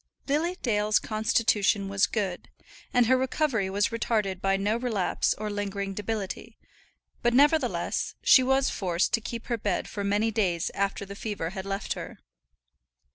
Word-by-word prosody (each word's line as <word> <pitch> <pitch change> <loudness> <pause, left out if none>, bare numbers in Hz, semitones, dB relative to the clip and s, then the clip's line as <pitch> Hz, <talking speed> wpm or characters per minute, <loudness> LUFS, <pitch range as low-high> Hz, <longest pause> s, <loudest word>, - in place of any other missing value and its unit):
Lily 325 +6 0
Dale's 210 -3 +2
constitution 215 -2 +1
was 195 0 +2
good, 195 -5 -3 0.4
and 245 -1 +4
her 260 +3 +4
recovery 260 -5 0
was 200 +2 +1
retarded 215 -5 -1
by 195 0 +2
no 205 +3 0
relapse 230 -6 0
or 215 - -4
lingering 200 -1 -3
debility; 210 -1 -4 0.6
but, 240 0 +2
nevertheless, 295 +4 +2
she 260 - +7
was 265 +1 +2
forced 180 -3 0
to 230 - +2
keep 230 +1 -6
her 235 -2 -2
bed 205 -3 -1
for 205 - -5
many 205 +3 +1
days 185 -6 0
after 200 0 -1
the 200 - -8
fever 200 -5 -4
had 190 0 -6
left 195 0 -2
her. - - -8
210 Hz, 155 wpm, -27 LUFS, 195-235 Hz, 0.6 s, she